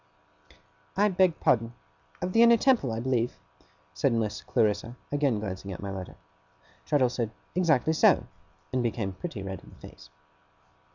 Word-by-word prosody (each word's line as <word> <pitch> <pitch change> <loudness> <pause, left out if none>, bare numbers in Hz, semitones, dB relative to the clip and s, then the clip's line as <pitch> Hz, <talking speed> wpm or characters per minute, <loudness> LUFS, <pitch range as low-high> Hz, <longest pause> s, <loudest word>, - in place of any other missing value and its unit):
'I 205 +1 +4
beg 185 -3 +2
pardon. 115 -1 +1 0.5
Of 180 +1 -2
the 230 - +5
Inner 235 0 +7
Temple, 240 - +2
I 110 - -3
believe?' 120 -1 -1 0.6
said 115 - +1
Miss 110 -3 -1
Clarissa, 110 +2 0 0.2
again 140 -6 +1
glancing 95 -1 -5
at 90 - -6
my 100 -1 -5
letter. 95 -1 -7 0.7
Traddles 130 -4 +2
said 115 -3 -1 0.2
'Exactly 160 -4 +2
so,' 155 - +4 0.5
and 130 - +1
became 110 -5 -2
pretty 120 - -6
red 95 0 -6
in - - -15
the - - -16
face. 75 0 -16
120 Hz, 155 wpm, -28 LUFS, 105-160 Hz, 0.7 s, Inner